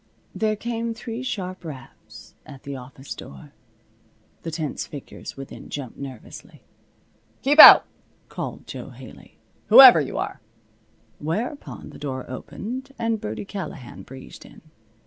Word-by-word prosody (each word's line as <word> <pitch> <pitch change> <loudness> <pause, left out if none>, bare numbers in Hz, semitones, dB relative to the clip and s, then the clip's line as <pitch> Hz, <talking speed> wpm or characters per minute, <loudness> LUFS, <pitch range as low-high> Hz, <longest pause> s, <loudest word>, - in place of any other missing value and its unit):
There 215 -1 0
came 230 +1 -4
three 230 +1 -6
sharp 185 -8 -5
raps 140 -6 -12
at 140 -3 -13
the 140 0 -6
office 135 +1 -9
door. 70 -1 -12 0.9
The 165 - -5
tense 155 -2 -4
figures 145 -1 -10
within 135 0 -10
jumped 135 -5 -7
nervously. 130 -5 -11 0.8
"Keep 290 +3 +2
out!" - - +12 0.4
called - - -7
Jo - - -8
Haley, - - -14 0.3
"whoever 255 - +10
you 140 - -5
are." - - -4 0.8
Whereupon 215 - -5
the - - -13
door 130 -3 -5
opened 255 - -7
and 225 -1 -1
Birdie 110 - -5
Callahan 180 -11 -8
breezed 130 0 -12
in. - - -16
160 Hz, 125 wpm, -23 LUFS, -, 0.9 s, out